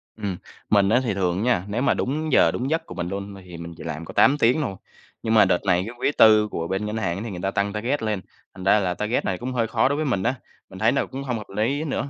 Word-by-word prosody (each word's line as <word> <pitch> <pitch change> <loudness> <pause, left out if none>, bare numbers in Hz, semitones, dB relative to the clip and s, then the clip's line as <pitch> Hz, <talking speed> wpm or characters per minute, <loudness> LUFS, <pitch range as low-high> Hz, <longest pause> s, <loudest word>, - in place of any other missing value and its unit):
Ừm, 100 -4 -4 0.3
mình 100 -2 +4
á 125 - +4
thì 115 - -1
thường 95 +1 0
nha, 120 -8 +2
nếu 110 +5 -2
mà 140 - +3
đúng 155 +4 -2
giờ 85 - +5
đúng 130 +8 -3
giấc 160 +1 -1
của - - -10
mình 85 -1 -3
luôn 100 0 -5
thì 90 -2 -10
mình 85 0 -8
chỉ - - -9
làm 80 +2 -5
có - - -10
8 145 +2 +5
tiếng 130 +4 +3
thôi. 100 -9 -3 0.5
Nhưng 110 - 0
mà 110 - +7
đợt 95 +1 0
này 90 -1 +3
cái 120 - -8
quý 145 - +1
tư 110 -1 +6
của 85 0 -3
bên 95 +2 -2
ngân 105 +1 -3
hàng 95 -4 -1
á, 100 - -5
thì 115 - -5
người 90 - -6
ta 95 - 0
tăng 100 0 -1
target 120 +7 -1
lên, 105 -4 -1 0.3
thành 95 - -9
ra 100 +3 +5
là 90 -3 0
target 105 +5 -1
này 95 -1 -1
cũng 130 +1 -5
hơi 115 -2 0
khó - - +2
đối 140 - 0
với 155 +1 -1
mình 100 -8 0
á, 130 - +1 0.3
mình 95 - -10
thấy 110 +3 +4
nó 140 - 0
cũng 135 +1 -7
hông 125 -4 -2
hợp 105 - -9
lý 135 +8 0
nữa. 140 -2 -3
105 Hz, 305 wpm, -24 LUFS, 95-125 Hz, 0.5 s, mà